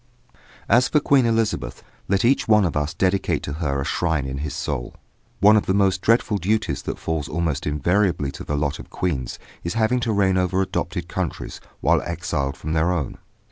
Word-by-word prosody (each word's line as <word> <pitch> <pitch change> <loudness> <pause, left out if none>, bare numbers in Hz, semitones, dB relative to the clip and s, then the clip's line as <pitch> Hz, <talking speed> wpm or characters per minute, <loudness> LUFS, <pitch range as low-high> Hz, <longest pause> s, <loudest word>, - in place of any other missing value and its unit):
As 125 +2 +4
for 150 - +3
Queen 140 -4 +3
Elizabeth, 115 -2 -1 0.2
let 100 +3 +2
each 135 +3 +3
one 105 -3 +5
of 85 - -2
us 75 +1 0
dedicate 95 +1 +1
to 70 - -4
her 70 -3 0
a 70 - -2
shrine 80 -3 0
in 65 0 -4
his 75 -1 -4
soul. - - -4 0.5
One 105 +2 +7
of 105 - +2
the 95 - +2
most 95 -2 +2
dreaded 110 -3 +2
duties 110 +5 0
that - - -4
falls 80 -3 -3
almost 80 -3 -1
invariably 85 0 +1
to - - -8
the 75 - -2
lot 70 0 -1
of - - -10
queens 70 -9 -2 0.3
is 85 +5 -3
having 115 +3 +2
to 115 -2 -1
reign 95 -3 +2
over 90 +1 +1
adopted 95 - -2
countries - - -4 0.2
while - - +3
exiled 85 -5 -3
from 80 - -4
their 80 +3 +2
own. 85 -6 -3
90 Hz, 195 wpm, -23 LUFS, 75-105 Hz, 0.5 s, One